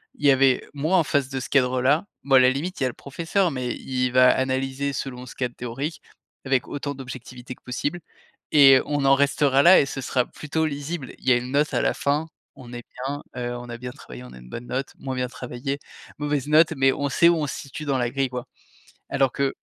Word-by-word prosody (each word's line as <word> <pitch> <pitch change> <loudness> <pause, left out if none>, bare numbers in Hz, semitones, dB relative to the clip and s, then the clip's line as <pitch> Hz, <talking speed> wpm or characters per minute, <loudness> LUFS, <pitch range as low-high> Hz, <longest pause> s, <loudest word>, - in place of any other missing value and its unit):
il 145 - -5
y - - +8
avait 135 -1 +3
moi 155 +6 +1
en 165 - +4
face 140 -2 0
de 135 -1 -3
ce - - -7
cadre-là. 130 +6 +2 0.2
Bon, 135 -1 +3
à - - +9
la 130 0 +6
limite, 155 +8 -3
il - - 0
y - - +3
a - - +1
le - - -8
professeur 170 +5 -1
mais 125 -2 -3
il 125 -1 -2
va 125 0 +6
analyser 135 +1 -1
selon 125 -1 -5
ce - - -11
cadre 125 -2 -3
théorique 140 +6 -5 0.4
avec 130 -2 +1
autant 145 0 -4
d'objectivité 125 -1 -9
que - - -32
possible. 145 +7 -3 0.5
Et 135 -3 +8
on 145 -1 -1
en 135 0 +6
restera 140 -1 +3
là 180 +2 +8
et - - +3
ce 135 0 -5
sera 125 -1 0
plutôt 160 +1 -3
lisible. 145 -1 -5
Il - - -14
y - - +6
a - - +4
une 125 +1 -5
note 145 +2 +1
à - - +1
la - - +1
fin, 150 +3 -1 0.3
on 120 -1 -12
est 120 0 -7 0.2
bien, 145 +1 -4
heu, 120 0 -3
on 120 0 -9
a 120 - -6
bien 125 0 -7
travaillé, 65 - -11
on 65 0 -12
a - - -12
une 60 0 -14
bonne 120 - -7
note, 135 +1 -3
moins 130 -1 -5
bien 125 0 -1
travaillé, 125 +3 -5 0.4
mauvaise 145 -1 -2
note 155 +1 +5
mais 135 0 +4
on 145 0 -2
sait 170 +5 +5
où 170 - +4
on 150 -2 -1
se - - -4
situe 145 +2 -8
dans 135 -2 0
la 120 -1 0
grille, 135 0 -1
quoi. 125 0 -6 0.6
Alors 135 -2 +2
que 140 -1 -1
135 Hz, 245 wpm, -24 LUFS, 125-145 Hz, 0.6 s, à